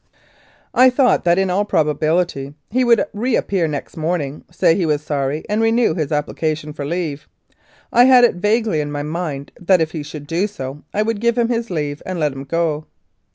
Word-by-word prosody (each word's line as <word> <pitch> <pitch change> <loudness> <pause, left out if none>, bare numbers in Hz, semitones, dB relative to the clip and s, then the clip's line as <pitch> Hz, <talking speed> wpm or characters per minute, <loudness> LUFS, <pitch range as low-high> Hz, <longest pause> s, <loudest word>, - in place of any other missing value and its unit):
I 255 +1 +6
thought 250 -5 +2
that 170 0 +4
in 190 -1 +1
all 195 +3 +2
probability 155 -4 0 0.2
he 255 +3 +2
would 235 -3 +4
re 235 +4 0
appear 185 -5 0
next 145 -2 -5
morning, 155 -3 -2
say - - +3
he 180 - 0
was 150 -1 0
sorry, 145 0 -2
and 210 +2 0
renew 225 -3 +3
his 155 -3 -3
application 150 0 -2
for 145 -2 -5
leave. 155 -2 -3 0.7
I 245 - +7
had 255 -1 +7
it 240 - +5
vaguely 210 -2 +1
in 145 0 -4
my 145 0 -3
mind 150 -3 -4
that 180 +1 +3
if 160 -1 0
he 155 - -4
should 145 0 -8
do 170 +6 0
so 140 -7 -7
I 210 - +1
would 220 -1 -2
give 235 0 +1
him 235 -1 +2
his 235 -1 -1
leave 150 -4 -3
and 185 -2 -4
let 150 -3 0
him 135 +1 -8
go. 155 0 -1
165 Hz, 200 wpm, -19 LUFS, 150-210 Hz, 0.7 s, I